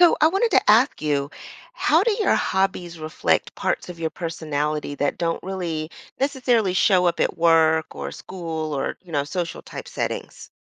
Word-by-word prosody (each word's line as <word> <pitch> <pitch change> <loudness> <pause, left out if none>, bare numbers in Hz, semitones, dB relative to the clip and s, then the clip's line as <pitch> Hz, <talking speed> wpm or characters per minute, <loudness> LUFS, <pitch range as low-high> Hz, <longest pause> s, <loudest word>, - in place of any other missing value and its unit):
So 350 -1 +7
I 310 - +6
wanted 390 +8 +2
to - - +3
ask 235 +6 +4
you, 145 -2 0 0.4
how 335 -8 +3
do 460 - +2
your 425 -2 +2
hobbies 185 -3 -1
reflect 155 0 0
parts - - -2
of 175 -1 -8
your 160 -1 -1
personality 150 -3 -3
that 145 0 0
don't 165 -1 -1
really 170 -5 -3 0.3
necessarily 250 -8 +1
show 185 -1 +4
up 175 - 0
at - - 0
work 160 -1 +3
or - - -5
school 160 -4 -5
or, 135 - -2
you 175 - -13
know, 145 -2 +1
social-type 170 +3 -5
settings? - - -5
170 Hz, 170 wpm, -23 LUFS, 155-210 Hz, 0.4 s, So